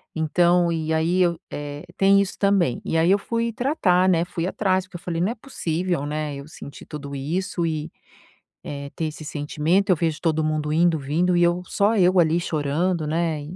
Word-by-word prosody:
então 175 +2 +2
e 160 -1 -1
aí 165 +3 +1
eu, 170 -2 +2
eh, 145 0 -6
tem 195 +1 +5
isso 195 - -4
também. 195 -9 +2
E 165 - 0
aí 165 +3 +4
eu 200 - +5
fui 230 +2 -2
tratar, 215 - +2
né, 170 -2 +3
fui 175 -1 -3
atrás 190 -1 0
porque 185 - -17
eu - - -17
falei: 175 -3 -3
“Não 190 +5 +1
é - - -17
possível, 175 - -3
né, 150 0 -3
eu 140 +1 -9
senti 145 -2 -11
tudo 140 -2 -8
isso 170 +6 -2
e, 155 -1 -3 0.7
eh, 140 0 -6
ter 165 - -2
esse 155 0 -7
sentimento. 155 +6 0
Eu 185 - +5
vejo 160 -1 -1
todo 160 -2 +1
mundo 155 -1 -1
indo 165 0 +3
vindo 165 +6 +1
e 175 - +3
eu 175 +1 +1
só 205 +4 +1
eu 185 -1 +4
ali 165 0 +3
chorando, 160 +2 -1
né, 160 -1 -1
170 Hz, 200 wpm, -23 LUFS, 155-185 Hz, 0.7 s, tem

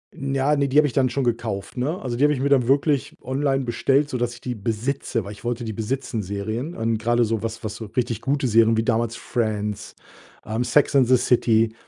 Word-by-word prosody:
N 135 0 -3
ja, 140 +3 +2
ne, 140 -1 +1
die 135 - 0
habe 150 -1 +6
ich 125 - -6
dann 130 -2 +2
schon 135 +1 -1
gekauft, 115 -3 -3
ne? 150 +9 -1
Also, 125 -3 -3
die 140 - +1
habe 150 - +5
ich 130 - -3
mir 140 - 0
dann 130 -4 +3
wirklich 140 0 +1
online 135 +1 0
bestellt, 135 +4 +1
sodass 120 -2 -2
ich - - -15
die 125 - -3
besitze, 115 +3 -2
weil 100 - -8
ich 105 - -12
wollte 120 0 -2
die 110 -2 -4
besitzen, 115 +1 -3
Serien. 110 - -4
Und 115 0 0
grade 120 +2 +2
so 110 -1 -1
was 115 +1 -5
was 110 -1 -4
so 115 -1 -7
richtig 120 -3 -1
gute 140 -1 0
Serien 115 0 +4
wie 110 - +2
damals 115 0 0
„Friends“, 105 -3 -3 0.5
ähm, 110 +3 -1
„Sex 145 +2 +2
and 130 -3 +5
the 130 0 +5
City“. 115 -2 +2
120 Hz, 230 wpm, -23 LUFS, 110-135 Hz, 0.5 s, habe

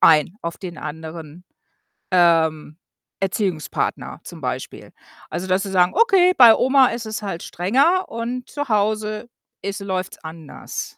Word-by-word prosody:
ein, 160 +3 +5
auf 170 0 -5
den 175 -4 -7
anderen, 160 +2 -8 0.7
ähm, 160 -4 +2 0.4
Erziehungspartner 190 -5 -2
zum - - -10
Beispiel. - - -5 0.4
Also, 180 - -4
dass 185 +1 +1
sie 195 - -5
sagen: 180 -1 +4
„Okay, 385 -6 +5
bei 235 -3 +9
Oma 265 0 +4
ist 235 -1 -4
es 215 0 -4
halt 195 -5 -5
strenger 275 - +2
und 240 +2 -5
zu 290 -2 -4
Hause 215 +1 0 0.3
ist 200 +1 -4
läuft's 190 -1 -3
anders.“ 160 -1 -8
195 Hz, 135 wpm, -21 LUFS, 170-230 Hz, 0.7 s, bei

